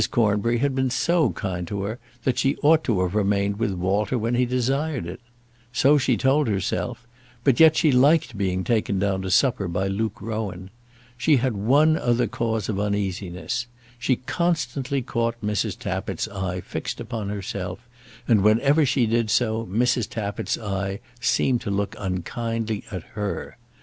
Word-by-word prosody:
Cornbury 115 -1 +2
had 140 +3 +1
been 130 0 +1
so 165 +2 +2
kind 90 -4 -4
to 100 +1 -3
her 110 +5 -4 0.2
that 130 - +1
she 135 +1 +2
ought 155 +2 +5
to 105 -7 +1
have 90 0 -2
remained 100 0 +1
with 110 -4 0
Walter 95 +6 0
when 115 +1 -1
he 125 0 +2
desired 135 - 0
it. 85 - -7 0.5
So 140 +4 +4
she 130 -3 +2
told 140 +2 +2
herself; 115 +4 -2 0.4
but 135 -4 +3
yet 160 -1 +7
she 155 -3 +4
liked 140 +1 +4
being 95 -2 -1
taken 110 -3 0
down 95 0 0
to 95 - -4
supper 105 -2 +2
by 90 +3 -1
Luke 105 +2 -2
Rowan. 100 -4 -5 0.5
She 150 +4 +4
had 130 0 0
one 145 +10 +4
other 120 0 +2
cause 110 -3 -2
of 100 -3 -2
uneasiness. 100 +1 -2 0.3
She 130 +1 +2
constantly 140 -2 -1
caught 115 0 -1
Mrs. 105 -3 -1
Tappitt's - - -3
eye 95 -2 -3
fixed - - -5
upon 110 -3 -4
herself, 100 +1 -5 0.4
and 110 -5 +4
whenever 130 +9 +4
she 125 -1 +2
did 115 0 +1
so 110 0 +1
Mrs. 120 +2 +1
Tappitt's 105 -2 -3
eye 100 -2 -3 0.2
seemed 125 +1 +2
to - - -4
look 100 0 -1
unkindly 110 +4 -3
at 95 -4 -5
her. 105 -2 -4
110 Hz, 165 wpm, -24 LUFS, 100-125 Hz, 0.5 s, yet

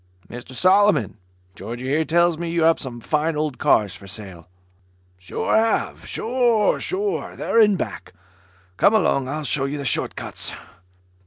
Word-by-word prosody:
"Mr 120 +4 -10
Solomon, 195 - +3 0.4
Georgie 120 +7 -7
here 150 +4 +1
tells 170 +1 +2
me 170 +1 -5
you 165 -1 0
have 165 0 +4
some 125 -4 -6
fine 155 +6 -1
old 150 -3 -2
cars 100 -3 +2
for 100 - -13
sale?" 95 -4 -9 0.7
"Sure 90 - -2
have. 225 0 0
Sure 235 -3 +1
have. 400 +3 -3
They're 230 - +1
in 210 -2 +5
back. - - -6 0.6
Come 205 - +4
along. 140 -10 +2
I'll 150 +3 -4
show 135 -1 +1
you 140 +2 -3
the 140 - -5
short - - 0
cuts." - - -5
155 Hz, 155 wpm, -22 LUFS, 125-205 Hz, 0.7 s, in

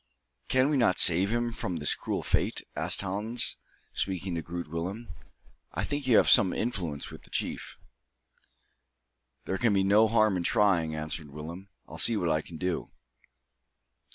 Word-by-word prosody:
"Can 130 +2 +2
we 145 - +1
not 115 -8 +2
save 90 +4 +7
him 120 0 -1
from 90 -5 -5
this 75 -2 +1
cruel - - -4
fate?" - - 0
asked - - 0
Hans, 105 +5 0 0.4
speaking 95 -1 -3
to 85 - -3
Groot 85 +2 -7
Willem. 90 +9 -6 0.6
"I - - -3
think 145 -2 -4
you 115 -4 +5
have - - +4
some 95 -3 +5
influence 85 -11 -4
with - - -11
the - - -18
chief." - - -4 1.7
"There 95 - -3
can 115 -4 +2
be 95 - +2
no 105 +3 +4
harm 110 -3 +2
in 90 - -3
trying," 85 -5 +1
answered 75 0 -5
Willem. 85 +7 -9 0.2
"I'll - - -9
see 115 - +5
what 85 -4 -1
I 75 0 0
can 80 +1 -11
do." 90 0 -3
95 Hz, 165 wpm, -28 LUFS, 85-110 Hz, 1.7 s, save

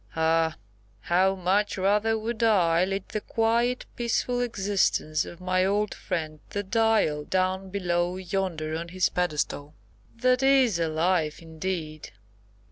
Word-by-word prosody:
Ah! 160 0 +2 0.5
how 190 +2 +2
much 195 +3 0
rather 210 +4 +2
would 225 +1 -4
I 180 -6 +3
lead 195 0 -3
the 215 - -3
quiet, 235 +3 0
peaceful 245 +1 -1
existence 195 -8 0
of 170 - -10
my 185 0 +1
old 205 +2 0
friend, 155 -3 -4
the 205 - -3
Dial, 215 -7 +2
down 185 +2 -1
below 180 -2 -1
yonder 180 -4 -3
on 165 +1 -4
his 185 +1 +1
pedestal. 150 -3 -2 0.4
That 255 +2 +2
is 265 -8 +4
a 165 - +1
life, 160 -1 0
indeed!" 160 -3 -5
185 Hz, 130 wpm, -26 LUFS, 165-210 Hz, 0.5 s, is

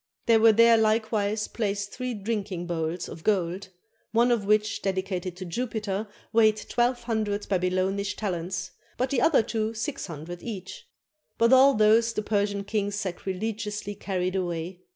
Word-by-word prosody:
There 230 -2 +5
were 225 0 +7
there 230 +1 +6
likewise 215 -1 +1
placed 200 -2 -2
three 250 -1 -4
drinking 200 -4 -3
bowls 170 0 -3
of 160 - -10
gold, 190 -1 0 0.4
one 235 +2 +3
of 225 -4 +1
which, 215 0 +2
dedicated 190 -2 -2
to 185 - -6
Jupiter, 215 0 -3 0.3
weighed 220 -1 +5
twelve 240 0 +1
hundred 215 -3 -2
Babylonish 190 +2 0
talents, 185 -2 -3 0.3
but 255 +3 -1
the 260 -4 +1
other 290 -6 +4
two 220 0 -2
six 250 +3 -4
hun 155 -4 -7
dred 175 +2 -8
each; 240 - -7 0.5
but 230 +2 +4
all 270 +1 +7
those 225 +2 +4
the 215 - -2
Persian 205 -1 0
kings 205 0 -2
sacrilegiously 205 +2 -4
carried 185 -2 -2
away. 175 -1 -3
205 Hz, 150 wpm, -26 LUFS, 185-225 Hz, 0.5 s, were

